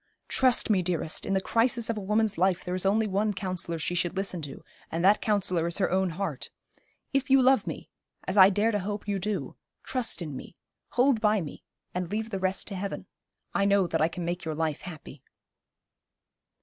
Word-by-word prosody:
Trust 255 -3 +3
me, 195 -3 +3
dearest, 170 -3 -1
in 195 - 0
the - - +3
crisis 235 +2 +1
of 230 - -1
a - - -4
woman's 210 +1 +1
life 185 0 +1
there 180 - -4
is 185 +1 0
one 215 +3 +3
only 205 +2 0
counsellor 185 -3 -3
she 160 +2 -2
should 175 +1 -1
listen 190 -3 -1
to, 140 -3 -8 0.3
and 165 +2 -1
that 205 +2 +5
counsellor 185 -5 +1
is 170 - -1
her 195 - +1
own 190 0 +2
heart. 195 +4 -4 0.6
If 275 +1 0
you 270 0 +6
love 265 +1 +4
me - - -6 0.3
as 185 - -3
I 190 -1 +9
dare 205 +3 +2
to 205 - 0
hope 205 +2 -5
you 200 -1 -1
do 190 -8 -3 0.3
trust 250 -9 -1
in 150 -4 -6
me, 150 - -9 0.4
hold 250 -2 +3
by 215 -1 +3
me, 155 -6 -7 0.3
and 180 -1 -3
leave 220 +2 -3
the 195 - -2
rest 190 0 -1
to 200 - -5
Heaven. 195 +1 -4 0.5
I 200 - +2
know 200 -1 +4
that 165 -2 -1
I 160 - +4
can 170 +1 -5
make 175 +1 -3
your 160 -1 -3
life 160 -1 -2
happy.' 155 -5 -10
190 Hz, 210 wpm, -28 LUFS, 175-210 Hz, 0.6 s, I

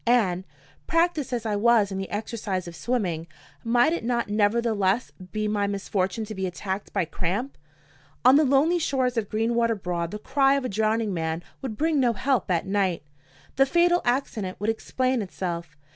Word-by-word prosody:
And, 190 -7 +2 0.4
practiced 330 -5 +1
as 235 -2 -2
I 215 -2 0
was 215 -1 +4
in 190 - -3
the 190 - -4
exercise 205 -4 -3
of 170 - -8
swimming, 175 -4 -2 0.4
might 240 +7 +3
it 340 - -3
not 235 -2 -1
nevertheless 210 0 +1 0.2
be 215 0 -1
my 205 -1 0
misfortune 200 +1 -2
to 215 - -7
be 190 -2 -2
attacked 190 +3 -4
by 175 - 0
cramp? 190 - -3 0.7
On 255 +2 +8
the 305 - +6
lonely 295 +6 +3
shores 260 -5 0
of 220 -4 -1
Greenwater 230 +1 +1
Broad 175 -2 -2
the 210 - -5
cry 270 +4 +2
of 275 -2 -1
a - - -1
drowning 215 0 0
man 160 0 -2 0.2
would 245 -6 -5
bring 315 -1 +2
no 245 -3 +3
help 255 +2 0
at 175 +1 +1
night. 190 -4 0 0.5
The 270 0 +5
fatal 350 +3 +3
accident 230 -7 -1
would 210 +3 +1
explain 255 +2 -1
itself. 170 -5 -5
220 Hz, 175 wpm, -25 LUFS, 190-255 Hz, 0.7 s, On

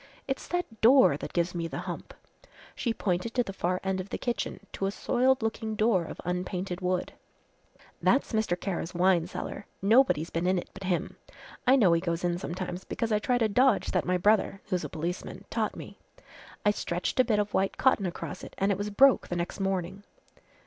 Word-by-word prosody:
It's 270 0 -3
that 355 -11 -3
door 250 - +7
that - - -6
gives 175 0 0
me 170 -1 -2
the - - -6
hump." - - -6 0.6
She 235 - -1
pointed 205 +1 -2
to 245 - +3
the 195 - -7
far 180 -1 -1
end 190 -1 -1
of 190 - -10
the - - -3
kitchen 240 -1 -3
to 195 - -1
a - - -1
soiled 255 +3 +1
looking 220 0 -2
door 215 -5 +2
of - - -8
unpainted 180 +1 -3
wood. 180 0 -1 0.9
"That's 270 - +2
Mr. 220 -5 0
Kara's 180 -2 -3
wine 175 -1 +3
cellar 200 +2 -6
nobody's 200 - +3
been 170 +2 -1
in 185 0 +3
it 175 - -5
but 195 0 -8
him. 180 -2 -1 0.5
I 260 - +7
know 200 -10 +5
he 165 - +2
goes 170 -1 -2
in 175 0 0
sometimes 180 0 -5
because 230 -1 -3
I 210 - +3
tried 245 +2 +1
a - - +4
dodge 250 +1 +3
that - - 0
my 180 0 +2
brother 200 +1 +2
who's 180 -3 0
a - - -4
policeman 170 +3 -5
taught - - -1
me. - - -10 0.7
I 205 - +6
stretched 180 +1 -3
a - - +8
bit 220 -4 +1
of 210 0 -1
white 195 0 +1
cotton 220 -7 +3
across 175 +1 -6
it - - -10
an' 195 +1 +2
it 195 - -1
was 205 +1 -2
broke 265 +6 +5
the 175 - -3
next 175 +3 -3
morning." 190 0 -2
195 Hz, 205 wpm, -28 LUFS, 180-220 Hz, 0.9 s, a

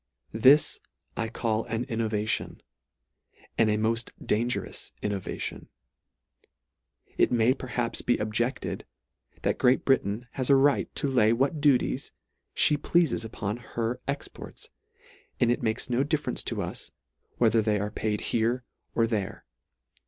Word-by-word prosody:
This 130 +7 +5 0.4
I 115 -1 -2
call 115 -2 -1
an 115 +1 -2
b 135 - -12
innovation; 110 -1 -1 0.9
and 110 -1 +3
a 105 - +2
molt 115 +2 0
dangerous 120 +3 -2
innovation. 100 -3 -4 1.5
It - - +4
may 120 +1 +4
perhaps 125 -3 -3
be 120 - +2
objected, 120 +4 -2 0.6
that - - 0
Great 125 +1 +3
Britain 120 -3 +1
has 130 -1 -2
a 140 - +7
right 140 +1 +3
to - - +1
lay 115 -5 +4
what 135 +5 0
duties 140 -4 +2 0.4
fhe 150 - +4
pleafes 170 -8 +2
upon 110 -1 -4
her 120 0 -3
c - - -38
ex 140 0 -2
ports, - - -11 0.7
and 120 - +4
it 120 - 0
makes 110 -2 -1
no 125 +2 +1
difference 150 +1 -1
to - - -1
us, - - -5 0.5
whether 115 -1 +4
they 105 -1 +1
are 105 +1 -2
paid 105 -1 -2
here 120 +2 +1 0.3
or 115 - +4
there. 105 -4 -3
115 Hz, 140 wpm, -27 LUFS, 110-130 Hz, 1.5 s, a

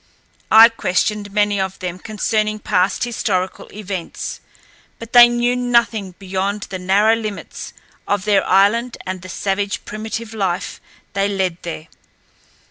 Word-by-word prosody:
I 225 +1 +10
questioned 210 -1 -1
many 205 -1 +1
of 190 0 -3
them 180 -1 -5
concerning 215 0 -1
past 190 -2 0
historical 195 -6 -2
events, 195 -4 -6 0.6
but 230 0 -11
they 240 -1 +9
knew 240 +1 +1
nothing 235 -6 +1
beyond 195 +2 -2
the 185 - -4
narrow 200 +5 +3
limits 215 -3 -6 0.4
of 200 -2 0
their 205 -2 +3
island 220 +6 +3
and 185 -1 -4
the 185 - -10
savage, 200 +2 -2
primitive 220 +1 -5
life 190 -5 -2 0.3
they 200 0 +1
led 190 -4 -1
there. 165 -2 -6
205 Hz, 130 wpm, -19 LUFS, 190-220 Hz, 0.6 s, I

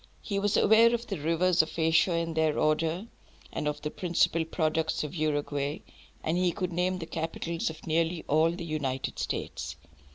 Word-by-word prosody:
He 200 -2 -1
was 205 0 +1
aware 230 +2 +6
of 235 0 -5
the 195 -8 -4
rivers 165 +3 +3
of 160 - -7
Asia 165 +2 +3
in 165 0 -1
their 160 -1 +1
order, 160 +5 +1 0.5
and 150 - -2
of 150 0 -3
the 150 - -2
principal 170 -2 +1
products 160 -1 0
of 150 0 -5
Uruguay; 145 -2 -1 0.4
and 165 +3 0
he 180 -1 +3
could 180 -1 -3
name 180 +2 0
the 170 - -5
capitals 165 +1 -3
of 160 - -10
nearly 165 +1 0
all 155 +3 +4
the 170 0 -5
United 140 -5 -3
States. - - -4
165 Hz, 175 wpm, -29 LUFS, 155-180 Hz, 0.5 s, aware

